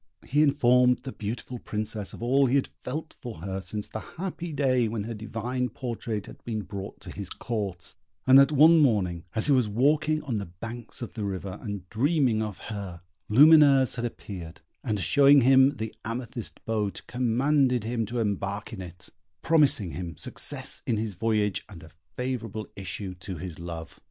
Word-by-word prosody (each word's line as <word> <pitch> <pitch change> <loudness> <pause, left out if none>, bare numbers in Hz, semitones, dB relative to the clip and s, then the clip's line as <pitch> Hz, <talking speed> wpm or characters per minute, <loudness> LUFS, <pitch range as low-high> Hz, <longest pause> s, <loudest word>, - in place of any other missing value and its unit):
He 145 +3 +2
informed 125 -4 +4
the 135 - -6
beautiful 120 +3 -5
Princess 105 -1 -4
of - - -9
all 135 +3 +4
he 125 - +2
had 140 - +1
felt 155 +5 -5
for 115 -9 -7
her 95 0 -3
since 105 +3 -4
the 110 - -5 0.2
happy 175 -1 -4
day 130 -5 +2
when 110 -1 -3
her 115 +2 -5
divine 120 +4 -3
portrait 115 -3 -4
had - - -13
been 110 -3 -3
brought 100 +1 -7
to - - -8
his 100 -3 -6
Court, 100 -7 -4 0.3
and 130 +1 +8
that 140 +2 +6
one 155 +3 +7
morning 95 - +2
as 110 - +2
he 150 - +4
was 125 -5 +3
walking 150 +7 +2
on 125 -6 -2
the 100 - -4
banks 115 +8 -7
of 120 - -7
the 110 - -4
river, 95 -1 -4
and 100 -4 -6
dreaming 130 -2 +2
of 105 -2 -4 0.2
her, 95 -4 -6 0.3
Lumineuse 140 +1 +7
had 120 - -4
appeared, 95 -6 -7 0.2
and, 110 -5 -1
showing 140 +6 +6
him 135 +2 +6
the 110 -2 -5
amethyst 120 0 -6
boat, 105 -3 -2
commanded 125 +1 +2
him 115 -1 -2
to 120 +3 -4
embark 100 0 -2
in 100 - -6
it, 90 0 -8 0.3
promising 145 - +3
him 85 -3 -6
success - - -2
in 115 - +1
his 110 -1 -2
voyage 105 +1 0
and 85 -6 -11
a 80 - -14 0.3
favourable 120 -4 -3
issue 95 0 -5
to 90 0 -7
his 90 -1 -7
love. 85 -1 -7
115 Hz, 180 wpm, -27 LUFS, 100-130 Hz, 0.3 s, and